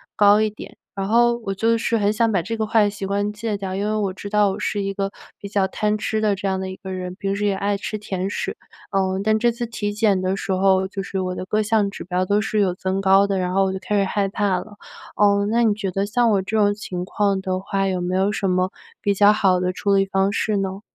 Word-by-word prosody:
高 205 Hz, +1 st, +5 dB
一 215 Hz, -, +2 dB
点。 210 Hz, -, -11 dB, 0.2 s
然 195 Hz, 0 st, -2 dB
后 235 Hz, +2 st, +3 dB
我 195 Hz, -, -1 dB
就 230 Hz, +4 st, +2 dB
是 230 Hz, 0 st, 0 dB
很 205 Hz, -1 st, +2 dB
想 225 Hz, +1 st, +2 dB
把 195 Hz, -5 st, +1 dB
这 225 Hz, +6 st, -4 dB
个 220 Hz, -1 st, -1 dB
坏 210 Hz, -2 st, +3 dB
习 200 Hz, -1 st, -6 dB
惯 200 Hz, +1 st, -1 dB
戒 210 Hz, 0 st, -3 dB
掉， 195 Hz, -2 st, -4 dB
因 200 Hz, +2 st, -2 dB
为 215 Hz, -, 0 dB
我 205 Hz, -3 st, 0 dB
知 200 Hz, +2 st, -8 dB
道 210 Hz, -1 st, +3 dB
我 195 Hz, -, -5 dB
是 205 Hz, 0 st, -1 dB
一 195 Hz, 0 st, -2 dB
个 195 Hz, 0 st, -2 dB, 0.3 s
比 200 Hz, -, -7 dB
较 200 Hz, -1 st, +1 dB
贪 210 Hz, +2 st, -1 dB
吃 215 Hz, +1 st, -2 dB
的 210 Hz, -2 st, +2 dB
这 195 Hz, -, -7 dB
样 190 Hz, -1 st, 0 dB
的 190 Hz, 0 st, -4 dB
一 185 Hz, -, -6 dB
个 190 Hz, -1 st, -8 dB
人， 180 Hz, -1 st, -5 dB
平 195 Hz, -1 st, -2 dB
时 210 Hz, -, -1 dB
也 200 Hz, -1 st, +1 dB
爱 200 Hz, +1 st, -1 dB
吃 215 Hz, +1 st, -4 dB
甜 190 Hz, -2 st, -3 dB
食。 -, -, -4 dB, 0.3 s
呃， 190 Hz, -1 st, 0 dB
但 215 Hz, +1 st, +2 dB
这 240 Hz, +2 st, +3 dB
次 235 Hz, +1 st, -4 dB
体 210 Hz, -3 st, -3 dB
检 205 Hz, -3 st, +2 dB
的 185 Hz, +1 st, 0 dB
时 195 Hz, -, -4 dB
候， 190 Hz, 0 st, +3 dB
就 195 Hz, 0 st, -4 dB
是 195 Hz, 0 st, -4 dB
我 185 Hz, 0 st, -2 dB
的 -, -, -5 dB
各 215 Hz, +3 st, 0 dB
项 215 Hz, -1 st, +2 dB
指 200 Hz, -, -8 dB
标 180 Hz, +1 st, -1 dB
都 205 Hz, +2 st, +2 dB
是 215 Hz, 0 st, -1 dB
有 190 Hz, -3 st, +2 dB
增 185 Hz, +1 st, -2 dB
高 195 Hz, +1 st, +4 dB
的， 195 Hz, -1 st, 0 dB
然 180 Hz, 0 st, -1 dB
后 195 Hz, +1 st, +3 dB
我 190 Hz, -, 0 dB
就 190 Hz, -, -4 dB
开 205 Hz, +2 st, -1 dB
始 200 Hz, -, +3 dB
害 195 Hz, +1 st, 0 dB
怕 195 Hz, -1 st, 0 dB
了。 205 Hz, +3 st, -11 dB, 0.4 s
呃， 200 Hz, -1 st, +3 dB
那 235 Hz, +2 st, +2 dB
你 220 Hz, -2 st, +3 dB
觉 205 Hz, -2 st, -3 dB
得 195 Hz, +2 st, -1 dB
像 235 Hz, +3 st, +2 dB
我 200 Hz, -2 st, +2 dB
这 205 Hz, +4 st, -2 dB
种 205 Hz, -1 st, +3 dB
情 185 Hz, -4 st, -5 dB
况 200 Hz, 0 st, 0 dB
的 185 Hz, -1 st, -2 dB
话， 195 Hz, 0 st, -1 dB
有 185 Hz, -2 st, -1 dB
没 180 Hz, +1 st, -2 dB
有 190 Hz, +1 st, +2 dB
什 200 Hz, -, -1 dB
么 185 Hz, 0 st, +1 dB, 0.3 s
比 200 Hz, -, +1 dB
较 205 Hz, +1 st, +6 dB
好 190 Hz, -4 st, +2 dB
的 180 Hz, 0 st, 0 dB
处 200 Hz, +2 st, 0 dB
理 195 Hz, -, +3 dB
方 195 Hz, 0 st, +1 dB
式 210 Hz, 0 st, 0 dB
呢？ 195 Hz, 0 st, -3 dB
200 Hz, 300 characters per minute, -22 LUFS, 190-210 Hz, 0.4 s, 较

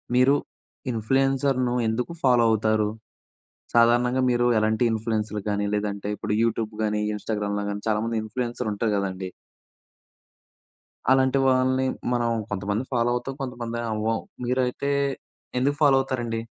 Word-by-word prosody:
మీరు 130 Hz, +3 st, +5 dB, 0.6 s
ఇన్‌ఫ్లుయెన్సర్‌‌ను 130 Hz, +2 st, +1 dB
ఎందుకు 120 Hz, +7 st, -1 dB
ఫాలో 125 Hz, -3 st, +5 dB
అవుతారు? 110 Hz, -1 st, +2 dB, 0.8 s
సాధారణంగా 120 Hz, +2 st, +4 dB
మీరు 120 Hz, 0 st, +2 dB
ఎలాంటి 110 Hz, +2 st, +1 dB
ఇన్‌ఫ్లుయెన్సర్‌‌లు 110 Hz, -1 st, -2 dB
కానీ 105 Hz, 0 st, 0 dB
లేదంటే 105 Hz, -1 st, -2 dB
ఇప్పుడు 105 Hz, -, -2 dB
యూట్యూబ్ 115 Hz, -1 st, -1 dB
కానీ 105 Hz, 0 st, 0 dB
ఇన్స్టాగ్రామ్‌లో 105 Hz, -1 st, -2 dB
కానీ 100 Hz, 0 st, -4 dB
చాలామంది 110 Hz, +2 st, 0 dB
ఇన్‌ఫ్లుయెన్సర్ 120 Hz, +1 st, -3 dB
ఉంటారు 110 Hz, +2 st, -1 dB
కదండీ... 95 Hz, -1 st, -3 dB, 1.8 s
అలాంటి 130 Hz, 0 st, +4 dB
వాళ్ళని 130 Hz, 0 st, +2 dB, 0.3 s
మనం 120 Hz, -1 st, +1 dB, 0.2 s
కొంతమంది 100 Hz, +3 st, -2 dB
ఫాలో 120 Hz, -1 st, +2 dB
అవుతాం, 125 Hz, +2 st, -4 dB
కొంతమంది 120 Hz, -3 st, -4 dB
అవ్వం, 110 Hz, +1 st, 0 dB, 0.3 s
మీరైతే 125 Hz, +2 st, 0 dB, 0.7 s
ఎందుకు 140 Hz, +3 st, +1 dB
ఫాలో 145 Hz, -3 st, +6 dB
అవుతారండి? 120 Hz, -4 st, -2 dB
115 Hz, 115 wpm, -25 LUFS, 105-130 Hz, 1.8 s, ఫాలో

